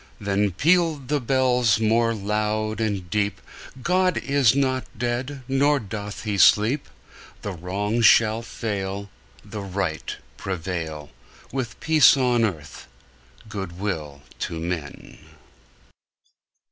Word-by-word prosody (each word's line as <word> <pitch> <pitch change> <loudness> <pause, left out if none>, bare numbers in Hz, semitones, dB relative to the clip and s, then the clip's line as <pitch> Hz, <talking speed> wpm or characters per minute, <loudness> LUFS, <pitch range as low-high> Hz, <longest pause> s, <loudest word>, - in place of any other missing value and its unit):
Then 100 0 +1
pealed 155 - +2
the 145 -1 +1
bells 125 -3 +2
more 115 +1 +2
loud 110 +1 -1
and 100 -5 -2
deep: 105 -1 0 0.4
"God 185 +2 +2
is 140 -4 +3
not 130 -2 +1
dead; 125 +4 -3
nor 140 +2 +3
doth 105 -1 -6
he 105 -3 -2
sleep! 110 - +4 0.5
The 100 - -3
Wrong 100 +6 -2
shall 110 -1 +5
fail, 100 -3 -4 0.3
The 105 - -6
Right 95 -4 -3 0.2
prevail, 80 -5 -4 0.4
With 120 -4 -4
peace 155 -3 +6
on 125 -3 +2
earth, 80 -9 -4 0.6
good 95 -4 -6
will 75 -8 -4 0.2
to 80 - -3
men!" 80 -3 -6
110 Hz, 110 wpm, -24 LUFS, 95-130 Hz, 0.6 s, peace